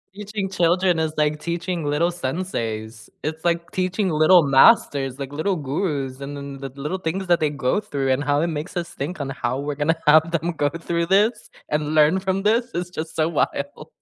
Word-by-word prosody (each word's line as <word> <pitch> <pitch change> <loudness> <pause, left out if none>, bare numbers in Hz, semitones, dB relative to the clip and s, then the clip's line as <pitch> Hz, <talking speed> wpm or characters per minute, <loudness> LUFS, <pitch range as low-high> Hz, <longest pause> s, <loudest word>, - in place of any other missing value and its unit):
Teaching 205 -1 -4
children 175 -1 +2
is 160 -1 -1
like 150 0 +1
teaching 170 -1 -3
little 155 +4 +1
senseis. 115 -9 -4
It's 160 +2 -4
like 170 0 0
teaching 185 +1 0
little 155 +2 +5
masters, 140 - +4
like 135 0 -5
little 170 +6 -1
gurus, 140 -3 -3
and 140 +1 -6
then 140 -1 -7
the 135 0 -6
little 150 +7 -3
things 185 +2 -3
that 175 -1 +4
they 155 -1 +1
go 135 +5 0
through, 135 -8 -2
and 130 +2 +1
how 145 +1 +1
it 170 - +1
makes 160 +3 -5
us 170 -1 -3
think 150 +3 -5
on 135 - -3
how 130 -1 -2
we're 145 0 -3
gonna 160 +3 0
have 160 +2 +6
them 170 +1 0
go 145 -3 0
through 170 +1 -2
this, 205 +6 +2 0.2
and 150 +1 -1
learn 155 +5 +5
from 190 0 -1
this 230 +3 +2
is 175 0 -3
just 160 -2 -6
so 160 0 +1
wild. 160 - -2
160 Hz, 200 wpm, -22 LUFS, 145-180 Hz, 0.2 s, have